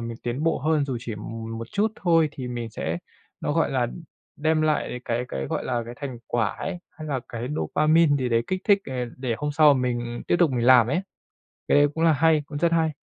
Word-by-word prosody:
mình 115 Hz, 0 st, -5 dB
tiến 120 Hz, +5 st, -3 dB
bộ 165 Hz, -, +1 dB
hơn, 155 Hz, 0 st, +1 dB
dù 135 Hz, -3 st, -3 dB
chỉ 115 Hz, -2 st, -5 dB
m 115 Hz, +2 st, -6 dB
một 115 Hz, -, -6 dB
chút 215 Hz, +2 st, +1 dB
thôi, 165 Hz, -3 st, +3 dB
thì 125 Hz, -3 st, -6 dB
mình 120 Hz, -2 st, -4 dB
sẽ, 85 Hz, -5 st, -3 dB, 0.4 s
nó -, -, -1 dB
gọi -, -, +1 dB
là, -, -, +1 dB
đ -, -, -7 dB, 0.5 s
đem 155 Hz, 0 st, +2 dB
lại 150 Hz, -5 st, 0 dB
cái 120 Hz, +1 st, -1 dB
cái, 65 Hz, -, -4 dB
gọi -, -, -3 dB
là, 120 Hz, -2 st, -1 dB
cái 120 Hz, +1 st, -8 dB
thành 130 Hz, -4 st, -6 dB
quả 115 Hz, -2 st, +1 dB
ấy, 190 Hz, -2 st, -4 dB
hay 155 Hz, 0 st, -9 dB
là 135 Hz, -3 st, -1 dB
cái 120 Hz, +2 st, -5 dB
dopamine 155 Hz, -1 st, +3 dB
gì 130 Hz, -3 st, -1 dB
đấy 115 Hz, -1 st, +2 dB
kích 185 Hz, 0 st, -2 dB
thích, 205 Hz, -1 st, +5 dB
ờ, 130 Hz, -, -5 dB, 0.2 s
để 125 Hz, -3 st, -2 dB
hôm 150 Hz, 0 st, -2 dB
sau 150 Hz, -1 st, +6 dB
m 130 Hz, -, 0 dB
mình 120 Hz, -1 st, -2 dB
tiếp 175 Hz, -, +3 dB
tục 175 Hz, -4 st, +4 dB
mình 120 Hz, -2 st, 0 dB
làm 125 Hz, -3 st, +7 dB
ấy. 145 Hz, +8 st, 0 dB, 0.7 s
Cái -, -, +5 dB
đấy 145 Hz, 0 st, +5 dB
cũng 165 Hz, -, 0 dB
là 165 Hz, -, +6 dB
hay, 155 Hz, +1 st, +3 dB
cũng 145 Hz, -1 st, -6 dB
rất 170 Hz, +2 st, +2 dB
hay! 165 Hz, -1 st, +2 dB
135 Hz, 250 wpm, -25 LUFS, 120-155 Hz, 0.7 s, làm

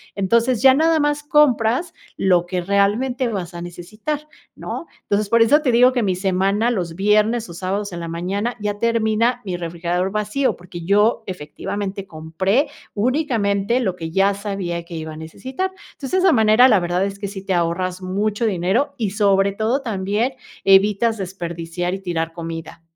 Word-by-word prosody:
Entonces 230 Hz, +4 st, +2 dB
ya 265 Hz, -1 st, +7 dB
nada 320 Hz, +2 st, +3 dB
más 295 Hz, 0 st, 0 dB
compras 295 Hz, +1 st, +2 dB, 0.2 s
lo 180 Hz, -2 st, +3 dB
que 180 Hz, 0 st, -2 dB
realmente 215 Hz, +7 st, +1 dB
vas 185 Hz, -4 st, -4 dB
a 170 Hz, -, -7 dB
necesitar, 215 Hz, -, -5 dB, 0.3 s
¿no? -, -, -6 dB, 0.2 s
Entonces 205 Hz, 0 st, 0 dB
por 230 Hz, 0 st, +4 dB
eso 290 Hz, +7 st, +5 dB
te 260 Hz, -5 st, +1 dB
digo 250 Hz, +2 st, +5 dB
que 245 Hz, -3 st, 0 dB
mi 185 Hz, -2 st, +1 dB
semana, 195 Hz, +4 st, +1 dB
los 175 Hz, -8 st, -2 dB
viernes 215 Hz, +3 st, +2 dB
o -, -, -8 dB
sábados 190 Hz, +2 st, -3 dB
en 170 Hz, -, -5 dB
la 165 Hz, -, -5 dB
mañana, 195 Hz, +8 st, -2 dB
ya 205 Hz, 0 st, -3 dB
termina 230 Hz, +1 st, +1 dB
mi 180 Hz, -2 st, -3 dB
refrigerador 175 Hz, +2 st, -2 dB
vacío, 215 Hz, +6 st, 0 dB
porque 175 Hz, -1 st, -9 dB
yo 205 Hz, +6 st, +2 dB
efectivamente 190 Hz, +4 st, -5 dB
compré 190 Hz, -, 0 dB, 0.3 s
únicamente 230 Hz, -3 st, +1 dB
lo 190 Hz, -7 st, -1 dB
que 165 Hz, -2 st, -6 dB
ya 195 Hz, +2 st, +3 dB
sabía 195 Hz, -4 st, -4 dB
que 170 Hz, 0 st, -9 dB
iba 160 Hz, 0 st, -6 dB
a 155 Hz, -, -10 dB
necesitar. 260 Hz, -, -4 dB, 0.2 s
Entonces, 270 Hz, -, -8 dB
de 375 Hz, -, +2 dB
esa 370 Hz, -, +6 dB
manera, 220 Hz, +2 st, +6 dB
la 210 Hz, -6 st, +5 dB
verdad 175 Hz, +2 st, 0 dB
es 200 Hz, 0 st, -5 dB
que 200 Hz, -1 st, -5 dB
sí 195 Hz, -1 st, -7 dB
te 190 Hz, -, 0 dB
ahorras 180 Hz, +2 st, -1 dB
mucho 205 Hz, +4 st, -1 dB
dinero 195 Hz, -, +1 dB
y 210 Hz, -5 st, -1 dB
sobre 200 Hz, -1 st, +3 dB
todo 220 Hz, +7 st, 0 dB
también 210 Hz, +3 st, -1 dB, 0.3 s
evitas 205 Hz, +3 st, +4 dB
desperdiciar 175 Hz, -1 st, -4 dB
y 195 Hz, -, -3 dB
tirar 165 Hz, -3 st, -3 dB
comida. 165 Hz, -1 st, -7 dB
200 Hz, 175 wpm, -21 LUFS, 180-230 Hz, 0.3 s, ya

